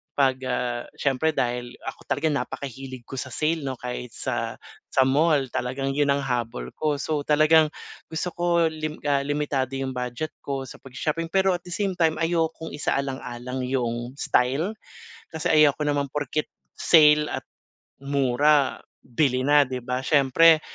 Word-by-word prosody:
'pag, 130 -2 +3
ah, 125 -1 -1 0.2
siyempre 140 +3 +1
dahil 120 -2 -1
ako - - -7
talaga 160 - 0
napakahilig 135 -2 -5
ko 135 - -7
sa 130 - -5
sale 155 +2 0
'no, 130 -2 -4
kahit 125 -1 -5
sa - - -3 0.3
sa 130 0 +4
mall 145 0 +3
talagang 135 +3 -2
'yun 145 -1 +3
ang 140 - +2
habol 125 -3 -2
ko. 150 -2 -1
So 150 0 -1
talagang 155 +1 +5 0.4
gusto 160 +2 -2
ko 175 0 -2 0.2
lim 155 -1 -5
ah, 140 -1 +2
limitado 145 -3 -1
'yung 135 -1 -3
budget 125 +5 -3
ko 135 -1 -3
sa - - -10
pagsa-shopping 155 +5 -3
pero 190 -1 +3
at 175 - -7
the 180 - -9
same 195 0 -1
time 160 -2 +2
ayokong 165 -1 -1
isaalang-alang 130 -3 -3
'yung 120 -2 -2
style, 140 - +1 0.6
kasi 160 -1 -5
ayoko 150 -1 +4
naman 145 -1 0
porket 150 +1 -2 0.2
sale 150 -2 +5
at - - -5 0.6
mura 140 +1 +2 0.2
bili 130 0 0
na, 145 0 +6
di 130 -1 -4
ba, 125 +1 -3
siyempre, 155 +3 +5
140 Hz, 155 wpm, -25 LUFS, 130-155 Hz, 0.6 s, na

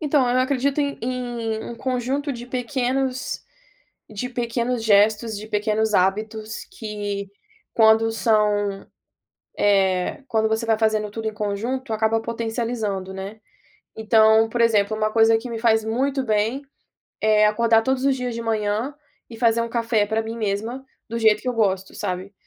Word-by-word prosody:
Então 290 -4 +2
eu 245 +1 +2
acredito 270 +2 +1
em 285 -1 -2
em 235 -3 -3
um - - -6
conjunto 260 +4 -2
de 240 -1 -8
pequenos 255 +1 -2 0.7
de 215 +4 -4
pequenos 240 -1 -2
gestos, 215 +1 +3
de 215 +1 -9
pequenos 215 0 0
hábitos 215 +3 -1
que 205 - -5 0.5
quando 225 0 +5
são, 210 -3 +1 0.7
eh, 195 +3 +1
quando 220 -2 +1
você 220 +1 -1
vai 225 -1 +2
fazendo 215 -1 0
tudo 220 +1 -4
em 220 - -3
conjunto 225 +4 -3
acaba 220 +1 +1
potencializando, 225 -4 -3
né. 195 +3 -7 0.6
Então, 220 0 +4
por 235 +1 -1
exemplo, 215 -2 +2
uma 215 0 0
coisa 225 0 +5
que 240 +2 -7
me 230 - -4
faz 220 -1 +3
muito 265 +4 0
bem, 220 +5 0 0.6
é 215 0 +4
acordar 225 +1 +3
todos 265 +2 0
os 275 -1 +3
dias 250 -2 -3
de 230 - -4
manhã 220 +4 -1 0.4
e 230 - -9
fazer 230 -1 +3
um 230 - -3
café 230 -3 +1
para 220 +1 0
mim 225 +1 -6
mesma, 220 +5 -3 0.2
do 230 +1 -3
jeito 220 -2 +3
que 255 - -3
eu - - +1
gosto, 195 -4 0
sabe? 185 +2 -4
225 Hz, 160 wpm, -22 LUFS, 215-245 Hz, 0.7 s, quando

